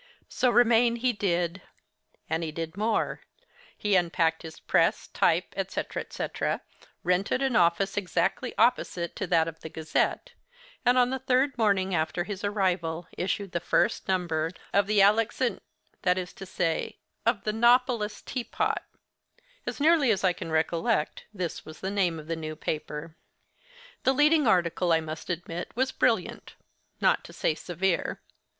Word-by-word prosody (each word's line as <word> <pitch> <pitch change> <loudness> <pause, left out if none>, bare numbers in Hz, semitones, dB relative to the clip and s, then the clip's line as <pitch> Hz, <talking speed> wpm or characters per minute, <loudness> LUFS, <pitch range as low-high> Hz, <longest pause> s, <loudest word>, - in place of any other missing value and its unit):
So 255 - +2
remain 235 0 +4
he 245 +1 +1
did; 180 -3 -1 0.7
and 160 +1 -1
he 160 - -3
did 165 +2 -5
more; 215 +3 0 0.6
he 205 -2 +1
unpacked 165 -2 +2
his 165 -1 -9
press, - - +2
type, - - +1
etc., - - -3
etc., - - -3 0.4
rented 185 +9 +1
an 265 -3 +1
office 175 +3 +3
exactly 205 +5 -1
opposite 175 -8 +1
to - - -2
that 165 -2 +3
of 165 0 -7
the 160 - -8
'Gazette,' 160 - -1 0.5
and, 250 0 +4
on 250 0 +4
the 265 - -2
third 260 +1 +2
morning 200 -5 +1
after 160 +1 0
his 205 +1 -6
arrival, 180 -5 -1
issued 195 +1 -2
the 170 - -1
first 175 - +1
number 170 -4 0 0.2
of 200 0 +3
'The 210 -1 +4
Alexan'—that 210 -3 0
is 180 -1 -4
to 195 - -10
say, 170 -3 -1 0.3
of 225 -3 +1
'The 215 - -1
Nopolis 235 -2 +2
Tea 250 - -3
Pot'—as - - -6
nearly 305 -3 +4
as 200 -3 +1
I 185 -1 +4
can 165 - -7
recollect, 160 -1 0
this 180 -5 -4
was 155 - -11
the 190 - -3
name 185 -5 +1
of 155 - -9
the 165 +1 -2
new 155 -1 -5
paper. 155 +1 -5 0.9
The 265 - +3
leading 295 0 +4
article, 175 -3 +2
I 165 - +5
must 155 +1 -7
admit, 175 0 -4
was 260 +2 +1
brilliant—not 225 -8 -1
to - - -11
say - - 0
severe. 175 +3 -1
190 Hz, 150 wpm, -27 LUFS, 165-235 Hz, 0.9 s, I